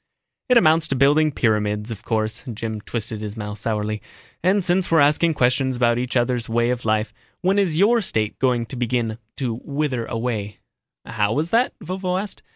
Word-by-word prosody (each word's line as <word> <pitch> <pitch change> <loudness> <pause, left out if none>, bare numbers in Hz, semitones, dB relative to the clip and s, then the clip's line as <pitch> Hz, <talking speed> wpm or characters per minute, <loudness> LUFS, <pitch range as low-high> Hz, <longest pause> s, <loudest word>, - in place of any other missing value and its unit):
"It 250 - +6
amounts 160 -6 +4
to 140 - -1
building 145 +4 +4
pyramids, 105 -3 0
of 105 -2 -6
course." 110 -1 -2
Jim 110 -1 -5
twisted 110 -1 -4
his 105 0 -6
mouth 105 -1 -5
sourly. 105 -1 -2 0.4
"And 190 +2 +2
since 180 +1 +1
we're 165 - +4
asking 150 +3 +3
questions 130 0 +1
about 120 -1 +2
each 125 +1 -1
other's 120 -1 0
way 120 +1 +2
of 125 -1 -3
life, 110 0 0 0.3
when 195 +2 +2
is 175 -6 +1
your 225 +6 +4
State 110 - -1
going 125 -3 +1
to 125 - -8
begin 120 -2 -1 0.2
to 120 -4 -3
wither 140 -5 -2
away?" 115 -4 -3 0.5
"How 105 0 0
was 155 +6 -1
that?" 240 +3 +2
Vovo 185 +1 -2
asked. 200 0 -7
125 Hz, 180 wpm, -22 LUFS, 110-155 Hz, 0.5 s, It